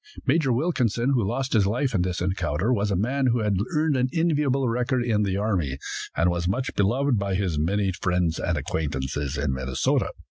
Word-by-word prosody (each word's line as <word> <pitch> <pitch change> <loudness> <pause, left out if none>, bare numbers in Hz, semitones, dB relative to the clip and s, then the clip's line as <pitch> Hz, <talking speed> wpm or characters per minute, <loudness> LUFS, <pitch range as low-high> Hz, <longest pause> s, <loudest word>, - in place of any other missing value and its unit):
Major 140 -1 +2
Wilkinson, 125 - +1
who 125 -5 +2
lost 130 +7 -2
his 105 -4 +4
life 125 +5 0
in 95 - +2
this 90 -1 -2
encounter, 95 +3 0
was 105 -3 0
a 100 - +1
man 130 +8 0
who 120 -1 +2
had 105 -3 +1 0.2
earned 155 -1 +2
an 130 0 +1
enviable 145 -5 +1
record 120 +1 0
in 110 -3 +1
the 100 -2 0
army, 90 -11 -1 0.4
and 85 +1 +3
was 85 0 -2
much 125 +8 -1
beloved 120 +4 +1
by 100 -1 -1
his 90 -6 -1
many 95 +5 +1
friends 90 -2 0
and 90 -3 -1
acquaintances 70 -1 -3
in 70 -1 0
Minnesota. 65 0 0
105 Hz, 190 wpm, -25 LUFS, 90-130 Hz, 0.4 s, his